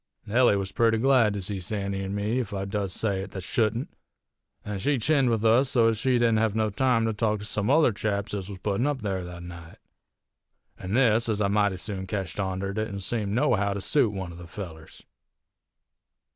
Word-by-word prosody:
Nellie 120 Hz, 0 st, +4 dB
was 95 Hz, -1 st, -2 dB
purty 115 Hz, +2 st, +2 dB
glad 120 Hz, -4 st, +3 dB
to 100 Hz, -, -4 dB
see 100 Hz, +1 st, -3 dB
Sandy 100 Hz, +1 st, -3 dB
an' 95 Hz, +1 st, -4 dB
me, 105 Hz, +5 st, 0 dB
ef 110 Hz, -5 st, -4 dB
I 95 Hz, -1 st, -3 dB
does 100 Hz, -1 st, -2 dB
say 100 Hz, -1 st, -1 dB
it 95 Hz, -, -7 dB
that 95 Hz, -, -5 dB
shouldn't; 115 Hz, +4 st, -1 dB, 0.7 s
an' 105 Hz, -1 st, -4 dB
she 140 Hz, +7 st, +1 dB
chinned 135 Hz, +1 st, +2 dB
with 115 Hz, -1 st, 0 dB
us 120 Hz, +4 st, +4 dB
so 115 Hz, -3 st, +4 dB
ez 110 Hz, -1 st, -1 dB
she 130 Hz, +2 st, +1 dB
didn't 120 Hz, -2 st, +3 dB
hev 110 Hz, -1 st, +1 dB
no 110 Hz, -1 st, +1 dB
time 125 Hz, +1 st, +2 dB
to 110 Hz, -, 0 dB
talk 105 Hz, 0 st, 0 dB
to 105 Hz, -, -8 dB
some 105 Hz, +1 st, 0 dB
other 150 Hz, -2 st, +5 dB
chaps 100 Hz, 0 st, -2 dB
ez 100 Hz, -1 st, -4 dB
was 100 Hz, -, -7 dB
puttin' 100 Hz, +7 st, -1 dB
up 140 Hz, -5 st, -2 dB
there 95 Hz, -3 st, -2 dB
that 90 Hz, 0 st, -8 dB
night. 85 Hz, -2 st, -10 dB, 1.0 s
An' 95 Hz, +3 st, -3 dB
this, 115 Hz, -2 st, +3 dB
ez 105 Hz, -2 st, 0 dB
I 100 Hz, -2 st, +1 dB
mighty 100 Hz, -2 st, +2 dB
soon 95 Hz, 0 st, -5 dB
ketched 95 Hz, 0 st, -4 dB
onter, 95 Hz, 0 st, -2 dB
didn't 110 Hz, -2 st, -3 dB
seem 105 Hz, 0 st, -2 dB
nohow 115 Hz, -7 st, +2 dB
to 100 Hz, -, -4 dB
suit 130 Hz, +2 st, +2 dB
one 95 Hz, -3 st, -5 dB
of 85 Hz, -, -11 dB
the 85 Hz, -, -10 dB
fellers. 80 Hz, -3 st, -9 dB
105 Hz, 215 wpm, -26 LUFS, 95-115 Hz, 1.0 s, other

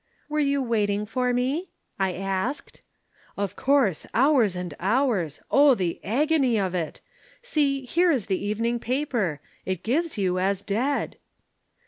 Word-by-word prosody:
"'Were 305 Hz, 0 st, -1 dB
you 280 Hz, -2 st, +1 dB
waiting 210 Hz, -3 st, 0 dB
for 250 Hz, +3 st, 0 dB
me?' 265 Hz, +9 st, -1 dB, 0.3 s
I 190 Hz, -1 st, +1 dB
asked. 195 Hz, +9 st, -3 dB, 0.6 s
"'Of 200 Hz, -1 st, -2 dB
course. 260 Hz, -, +2 dB
Hours 250 Hz, -7 st, +4 dB
and 180 Hz, -1 st, -5 dB
hours. 200 Hz, -, 0 dB
O 280 Hz, -2 st, +6 dB
the 180 Hz, -5 st, -3 dB
agony 265 Hz, 0 st, +2 dB
of 190 Hz, -2 st, -1 dB
it! 170 Hz, -4 st, -3 dB, 0.4 s
See, 280 Hz, -, 0 dB
here 345 Hz, +7 st, +2 dB
is 265 Hz, -10 st, +1 dB
the 190 Hz, 0 st, -2 dB
evening 230 Hz, +3 st, -1 dB
paper! 235 Hz, -, -1 dB, 0.2 s
It 185 Hz, -2 st, -3 dB
gives 310 Hz, +6 st, 0 dB
you 185 Hz, -2 st, 0 dB
as 195 Hz, +1 st, 0 dB
dead.' 250 Hz, +9 st, -1 dB
230 Hz, 140 wpm, -25 LUFS, 195-275 Hz, 0.6 s, O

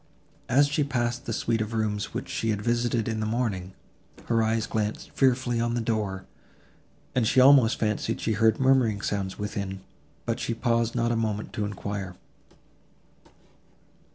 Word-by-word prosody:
As 140 Hz, +3 st, +5 dB
she 145 Hz, +1 st, +1 dB
passed 120 Hz, -3 st, -2 dB
the -, -, -2 dB
suite 115 Hz, 0 st, 0 dB
of 110 Hz, +1 st, -3 dB
rooms 105 Hz, -2 st, -1 dB
which -, -, -5 dB
she 115 Hz, -, -2 dB
had 105 Hz, -2 st, 0 dB
visited 120 Hz, -1 st, 0 dB
in 110 Hz, -1 st, -2 dB
the 110 Hz, -, -1 dB
morning, 105 Hz, -6 st, -2 dB, 0.5 s
her 115 Hz, -1 st, +2 dB
eyes 110 Hz, 0 st, +1 dB
glanced 110 Hz, -2 st, -3 dB
fearfully 130 Hz, -2 st, +2 dB
on 120 Hz, 0 st, 0 dB
the -, -, 0 dB
door, 105 Hz, -5 st, -2 dB, 0.9 s
and 120 Hz, -3 st, +2 dB
she 130 Hz, -, +3 dB
almost 130 Hz, -3 st, +6 dB
fancied 110 Hz, +1 st, -1 dB
she 110 Hz, -, 0 dB
heard 110 Hz, +1 st, +3 dB
murmuring 130 Hz, -6 st, +3 dB
sounds 100 Hz, -2 st, -2 dB
within, 100 Hz, -2 st, -4 dB, 0.4 s
but -, -, -1 dB
she 115 Hz, -, -2 dB
paused 115 Hz, 0 st, 0 dB
not 120 Hz, -1 st, +1 dB
a -, -, +1 dB
moment 110 Hz, -2 st, -2 dB
to 105 Hz, -, -2 dB
enquire. 100 Hz, -2 st, -5 dB
115 Hz, 160 wpm, -26 LUFS, 105-120 Hz, 0.9 s, almost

